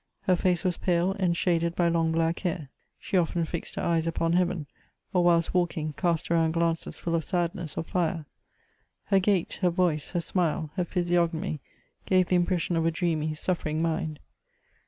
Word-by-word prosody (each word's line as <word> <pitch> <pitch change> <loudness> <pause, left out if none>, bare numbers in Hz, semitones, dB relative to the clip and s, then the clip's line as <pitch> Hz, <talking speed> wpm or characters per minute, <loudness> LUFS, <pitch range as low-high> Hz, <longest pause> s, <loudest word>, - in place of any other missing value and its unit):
Her 185 -2 +3
face 180 0 +1
was 180 -2 0
pale, 175 +1 +1
and 175 -3 +1
shaded 170 -1 +1
by 175 - +2
long 165 -1 +2
bbick 165 +1 +1
hair. 170 -6 -3 0.3
She 190 - -1
often 170 0 0
fixed 170 +1 -5
her - - -3
eyes 165 -1 +1
upon 165 0 0
heaven, 180 -3 +1 0.5
or 180 -1 +3
whilst 170 -1 +3
walking, 165 -4 0
cast 170 0 -1
around 165 -1 +3
glances 165 -1 -1
full 170 - -3
of 165 -1 +1
sadness 170 -3 -2
or - - -1
fire. 165 -2 -1 0.8
Her 195 -1 +3
gait, 190 -2 0
her 180 - +4
Toice, 170 -4 0
her 175 - +1
smile, 165 -3 0
her 180 -3 0
physiognomy, 175 -2 0 0.5
gave 185 -1 +3
the 185 - +3
impression 175 -1 +1
of 165 0 +2
a - - +5
dreamy, 160 -2 -1
suffering 155 -2 -1
mind. 160 -2 -1
170 Hz, 180 wpm, -27 LUFS, 165-180 Hz, 0.8 s, a